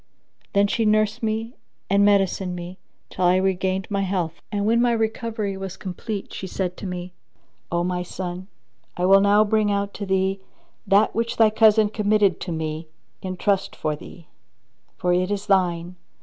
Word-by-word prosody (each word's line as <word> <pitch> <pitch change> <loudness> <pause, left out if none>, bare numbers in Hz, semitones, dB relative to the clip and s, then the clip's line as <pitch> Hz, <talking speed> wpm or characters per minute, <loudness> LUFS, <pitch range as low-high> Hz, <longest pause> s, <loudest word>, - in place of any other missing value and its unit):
Then 200 0 +4
she 230 +3 0
nursed 215 +2 +2
me 225 +1 -2 0.3
and 200 +1 +3
medicined 195 -2 +2
me 175 +1 -8 0.3
till - - -3
I 180 +1 +5
regained 190 0 0
my 200 -1 0
health; 180 -4 -2
and, 205 -1 -1
when 230 +2 +3
my 240 -1 +3
recovery 220 -2 -2
was 190 -1 -6
complete, 195 +2 -6
she 190 - -5
said 180 -1 -3
to 200 - -6
me, 180 0 -6 0.6
"O 170 0 +1
my 180 0 -1
son, 180 +1 -6 0.5
I 180 - +1
will 195 +1 +6
now 205 +1 +5
bring 215 -1 +1
out 200 0 -1
to 200 - -6
thee 190 0 +1 0.5
that 200 +3 +4
which 230 +1 -2
thy 220 -1 +5
cousin 220 -1 +5
committed 210 -3 +2
to 180 - -5
me 160 0 -4 0.3
in 185 -1 -5
trust 195 0 0
for 155 -1 -2
thee; 165 +2 -13 0.7
for 180 0 +1
it 180 +1 +1
is 205 0 -2
thine. 180 -3 +1
195 Hz, 175 wpm, -23 LUFS, 180-210 Hz, 0.7 s, will